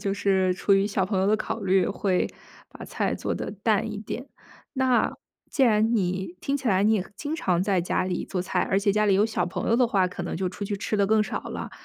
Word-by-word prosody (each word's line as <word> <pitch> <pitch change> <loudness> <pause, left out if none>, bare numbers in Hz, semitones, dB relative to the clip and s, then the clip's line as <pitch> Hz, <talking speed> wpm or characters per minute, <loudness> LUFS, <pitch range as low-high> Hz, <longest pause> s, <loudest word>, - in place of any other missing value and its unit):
就 195 0 -1
是 190 -2 +2
出 200 - +1
于 195 +1 +3
小 200 -2 0
朋 190 -1 -1
友 190 - +2
的 215 - +3
考 220 +1 -4
虑， 190 -2 +2
会 185 -3 0 0.4
把 - - -10
菜 - - -1
做 - - -3
得 - - -4
淡 215 +1 0
一 205 - -5
点。 240 +5 -6 0.5
那， 260 -2 +2 0.4
既 275 - +1
然 225 -1 +4
你 185 -3 -1
听 280 +1 -1
起 260 -4 -2
来 190 -1 +3
你 220 +1 +4
也 195 -3 0
经 305 +1 -4
常 180 - +1
在 195 -2 +1
家 180 +1 0
里 180 -1 -2
做 185 - -3
菜， 185 - -1
而 195 - +3
且 200 0 +2
家 215 0 +2
里 195 - +4
有 205 +3 +4
小 225 - -1
朋 180 - -4
友 230 - +3
的 250 - +4
话， 195 -5 +2
可 180 0 -6
能 175 - -4
就 185 +1 -1
出 195 +3 -6
去 200 0 -3
吃 215 +2 -2
得 200 -1 +3
更 215 +1 +3
少 - - -3
了。 - - -6
200 Hz, 275 characters per minute, -25 LUFS, 190-220 Hz, 0.5 s, 然